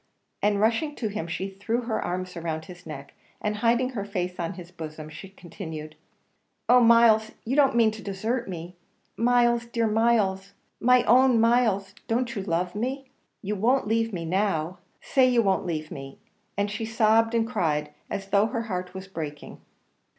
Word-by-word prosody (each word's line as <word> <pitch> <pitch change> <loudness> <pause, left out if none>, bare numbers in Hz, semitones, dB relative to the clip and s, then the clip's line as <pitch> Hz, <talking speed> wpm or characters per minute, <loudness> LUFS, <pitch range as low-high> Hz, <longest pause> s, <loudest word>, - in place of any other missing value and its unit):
and 205 0 +2
rushing 230 +8 +1
to 220 - -2
him 200 -5 -4
she 185 +3 -3
threw 195 +5 -2
her 230 -2 -2
arms 185 0 -4
round 160 -2 -4
his 180 -1 -12
neck, 140 -3 -8 0.3
and 210 0 -2
hiding 240 +3 +2
her 215 -6 -3
face 180 -3 -4
on 170 +2 -2
his 175 -1 -11
bosom, 155 -3 -8
she 155 +5 -10
continued, 160 -5 -8 0.7
"Oh, 250 - +7
Myles! 230 -2 +5
you 250 +4 -1
don't 280 -4 +4
mean 230 -2 +4
to 220 0 -9
desert 220 +4 -3
me! 175 0 -7 0.4
Myles 240 0 +3
dear 235 -1 0
Myles 210 -3 +1 0.3
my 250 +1 +5
own 250 0 +5
Myles 220 -4 +2
don't 235 +1 0
you 200 - -2
love 180 -1 -1
me? 260 +5 -4 0.3
you 205 +2 -2
won't 245 +7 +2
leave 225 +1 +1
me 170 -4 -4
now 180 -1 -1 0.2
say 260 -2 +3
you 240 -2 +3
won't 190 -2 +1
leave 155 -2 -3
me!" 135 0 -8 0.4
and 200 0 0
she 215 +2 -4
sobbed 225 +1 +3
and 225 -1 +2
cried 150 -9 -1 0.2
as 195 0 -5
though 205 +2 +4
her 230 -1 -3
heart 180 -4 -5
was 190 0 -7
breaking. 155 -5 -7
205 Hz, 175 wpm, -26 LUFS, 180-230 Hz, 0.7 s, Oh